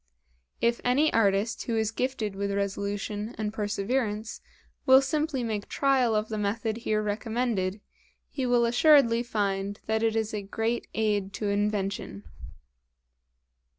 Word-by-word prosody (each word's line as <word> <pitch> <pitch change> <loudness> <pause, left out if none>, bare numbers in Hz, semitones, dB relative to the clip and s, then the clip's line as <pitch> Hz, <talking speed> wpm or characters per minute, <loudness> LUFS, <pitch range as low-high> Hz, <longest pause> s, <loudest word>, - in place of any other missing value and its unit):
If 235 0 +1
any 275 +5 +3
artist 205 0 +1
who 230 -2 -1
is 220 -1 0
gifted 230 -4 -2
with 200 0 -2
resolution 200 +2 -3
and 215 -1 -3
perseverance 215 +1 -2 0.5
will 260 0 +9
simply 295 -1 -1
make 215 -3 -3
trial 260 -5 +2
of 215 +1 0
the 215 -1 -3
method 220 +2 -1
here 215 -2 -1
recommended, 210 -2 -1 0.5
he 265 -3 -3
will 240 -1 +3
assuredly 240 -1 +5
find 200 -3 -2
that 220 0 0
it 225 -1 +1
is 220 -1 -1
a 210 - -2
great 225 +4 -2
aid 205 -3 0
to 210 -1 -2
Invention. 200 - -2
220 Hz, 135 wpm, -27 LUFS, 205-235 Hz, 0.5 s, will